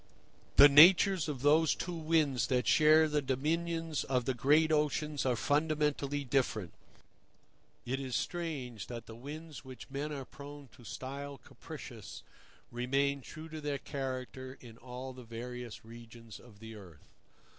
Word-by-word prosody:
The 140 - +10
natures 170 +3 +7
of 135 -3 -5
those 155 +2 +4
two 180 - -4
winds 155 -5 +1
that 125 -2 +1
share 155 +1 +6
the 150 -1 0
dominions 160 +3 -1
of 125 -2 0
the 130 - 0
great 150 +6 +3
oceans 150 -1 0
are 125 - +2
fundamentally 145 0 0
different. 120 - -1 1.1
It 130 +2 -2
is 130 -3 -4
strange 145 - -4
that 115 -2 -7
the 115 - -10
winds 150 +6 -9
which 130 0 -11
men 145 +2 -3
are 140 -3 -5
prone 145 0 -11
to 120 - -18
style 140 +4 -6
capricious - - -10 0.5
remain 135 +3 0
true 155 +4 -10
to 155 -1 -7
their 145 -1 -2
character 130 -1 -5
in 115 -3 -13
all 130 +1 -7
the 125 0 -11
various 120 0 -7
regions 115 -1 -12
of 115 -4 -17
the 110 +1 -10
earth. 90 -8 -14
140 Hz, 145 wpm, -32 LUFS, 125-150 Hz, 1.1 s, The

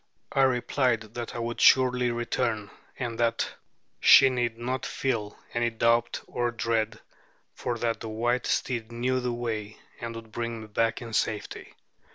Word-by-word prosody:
I 135 - +2
replied 125 -2 +2
that 120 -1 -5
I - - -3
would 120 0 -3
surely 125 -1 +5
return, 120 -3 -1 0.3
and 120 -3 -4
that 115 -1 +1 0.5
she 135 - +8
need 120 -2 -1
not 125 +2 -3
feel 110 -6 -2 0.2
any 120 0 +1
doubt 115 +1 +1
or 120 0 -1
dread, 115 -1 -1 0.5
for 120 -1 -3
that 115 0 -1
the 115 - -6
white 120 +3 0
steed 120 -3 -1
knew 125 +2 0
the 125 -1 -1
way, 110 -3 -4 0.2
and 115 -1 -5
would 115 -1 -9
bring 115 0 -4
me - - -8
back 115 +2 0
in 115 -1 -8
safety. 110 -1 -2
120 Hz, 160 wpm, -27 LUFS, 115-125 Hz, 0.5 s, she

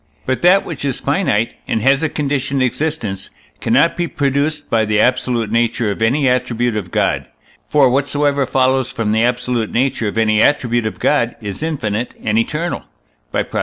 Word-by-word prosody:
But 130 0 -1
that 185 +3 +5
which 160 -5 -6
is 135 -3 -1
finite, 140 - 0
and - - 0
has 135 +2 +4
a 160 - +1
conditioned 140 -2 -1
existence, 130 -8 -2 0.3
cannot 165 - +2
be 175 0 -1
produced 145 +1 -1
by 115 -1 +2
the 105 -1 +1
absolute 125 -2 +1
nature 115 -1 +1
of 100 - -6
any 130 +5 +2
attribute 120 -2 0
of 100 -4 -4
God; - - 0 0.4
for 145 -3 +5
whatsoever 140 +1 +1
follows 130 -1 +1
from 115 -5 -2
the 110 +1 +2
absolute 125 -1 0
nature 125 -2 0
of 105 - -4
any 110 -1 +3
attribute 120 -5 +2
of 110 - -6
God 120 0 +1
is 105 0 -6
infinite 120 -8 -2
and 110 0 +1
eternal 155 +9 -2 0.5
(by - - 0
Prop. - - -4
125 Hz, 175 wpm, -17 LUFS, 115-145 Hz, 0.5 s, that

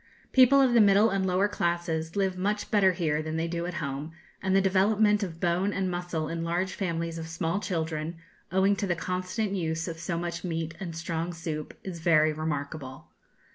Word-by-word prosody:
People 260 +1 +6
of 260 -3 +4
the 235 - +7
middle 205 +2 +5
and 190 -1 0
lower 185 +2 +2
classes 170 -4 -1
live 190 -2 +1
much 205 +3 -2
better 195 -3 +4
here 155 -4 0
than 155 +1 -3
they 165 +1 0
do 170 +1 -3
at 180 - -5
home, 145 +1 -4 0.3
and 190 0 +1
the - - +6
development 205 +2 +3
of 170 -5 -4
bone 180 +3 +1
and 190 -2 -1
muscle 175 -3 -3
in 165 +1 -3
large 175 +3 -1
families 165 -3 -2
of 160 - -6
small 165 +3 -1
children, 160 -4 -3 0.4
owing 190 +2 +3
to 200 - -1
the 175 - +1
constant 185 +5 -2
use 165 -3 -2
of 165 -1 -5
so 170 0 -2
much 170 0 -4
meat 165 -2 -3
and 175 -4 -5
strong 165 +1 -3
soup, 160 -2 -5
is 180 -3 -6
very 155 -2 +4
remarkable. 145 -3 -5
170 Hz, 195 wpm, -28 LUFS, 160-190 Hz, 0.4 s, the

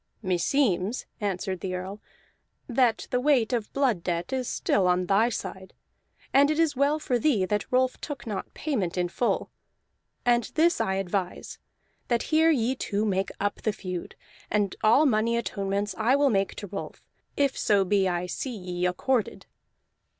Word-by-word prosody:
"Meseems," 190 +3 +1
answered 190 -2 -2
the 185 +1 -3
Earl, 190 +3 -6 0.7
"that 245 -2 +1
the 250 - +2
weight 255 -4 +2
of 230 -3 -2
blood 260 -10 +1
debt 175 +6 -2
is 255 -2 -1
still 190 -2 +1
on 180 0 +2
thy 200 +5 +3
side, 190 -4 -6 0.6
and 280 +2 +6
it 305 - +1
is 325 -3 +2
well 280 +3 +2
for 255 -5 -1
thee 245 -11 +2
that 210 +1 -2
Rolf 255 0 +1
took 290 -4 -6
not 210 -4 -5
payment 210 - -2
in 175 -1 0
full. 240 +7 -1 0.7
And 240 -2 +3
this 335 +2 +3
I 190 - 0
advise, 190 -1 -3 0.5
that 235 -1 +1
here 320 +1 +5
ye 255 -5 +2
two 210 -5 -2
make 195 -2 0
up 205 +1 -2
the 215 - +1
feud; 185 -4 -6 0.3
and 205 -2 0
all 230 +8 +5
money 230 -2 +2
atonements 200 -2 -2
I 235 +4 +3
will 280 -1 +3
make 195 -2 0
to - - -6
Rolf, 195 0 -7 0.3
if 280 -2 +2
so 200 -2 +2
be 195 0 +2
I 175 0 -1
see 245 +7 -4
ye 180 -1 -2
accorded." 220 +6 -1
215 Hz, 165 wpm, -27 LUFS, 190-255 Hz, 0.7 s, and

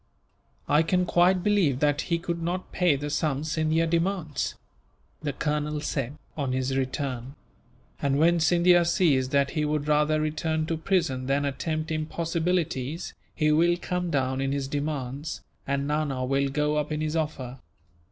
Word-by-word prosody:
"I 150 +2 +4
can 180 +2 +1
quite 180 +1 +3
believe 185 -11 +2
that 145 0 +2
he 170 - +2
could 170 0 -3
not 175 +2 -3
pay 180 -5 +3
the 145 +2 -4
sum 150 -2 0
Scindia 160 +1 +1
demands," 170 -2 -1 0.7
the 150 -2 -1
colonel 150 +1 -1
said, 140 -1 -3 0.2
on 140 -4 -1
his 130 +1 -1
return; 130 -1 -3 0.7
"and 140 -1 +1
when 170 +3 +4
Scindia 175 +1 +5
sees 160 -7 +2
that 140 0 +2
he 155 -2 -1
would 150 -1 -1
rather 150 +1 +3
return 155 +1 -1
to 165 - -1
prison 155 -7 0
than 140 +1 +1
attempt 155 +3 -2
impossibilities, 160 -1 -1 0.2
he 155 0 +2
will 170 +3 +4
come 180 -1 -2
down 130 -3 0
in 135 0 0
his 140 -1 -2
demands, 145 0 -3 0.2
and 140 0 0
Nana 145 -4 -1
will 135 +1 +1
go 150 +2 0
up 150 +1 -1
in 150 - -1
his 155 +1 -1
offer. 135 -5 -3
150 Hz, 160 wpm, -27 LUFS, 140-165 Hz, 0.7 s, Scindia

